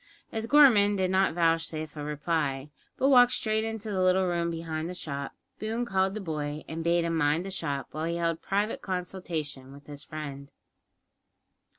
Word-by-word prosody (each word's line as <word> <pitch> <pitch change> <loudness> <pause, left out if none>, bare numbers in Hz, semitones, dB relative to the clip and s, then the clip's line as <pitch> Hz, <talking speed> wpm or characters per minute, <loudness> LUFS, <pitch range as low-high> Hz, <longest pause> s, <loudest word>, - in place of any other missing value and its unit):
As 225 0 -3
Gorman 230 -8 +6
did 185 -1 0
not 190 -3 +2
vouchsafe 165 -2 0
a 150 - -5
reply, 150 -2 -2 0.3
but 270 - +3
walked 245 -2 +7
straight 220 0 0
into 225 -1 -4
the 190 -2 0
little 185 +1 +4
room 170 -1 0
behind 165 -1 -4
the 180 - -6
shop, 140 -5 -5 0.2
Boone 225 +3 -2
called 190 -2 +1
the - - -3
boy, 150 -5 -4
and 165 +1 -5
bade 170 +1 +2
him 165 0 -1
mind 160 +2 +1
the 195 - -5
shop, 140 -7 -3
while 155 +1 -3
he 170 +1 -1
held 165 -1 -1
private 205 +3 -1
consultation 170 -7 -4
with 140 +1 -14
his 145 0 -9
friend. 140 -2 -7
170 Hz, 180 wpm, -28 LUFS, 150-195 Hz, 0.3 s, walked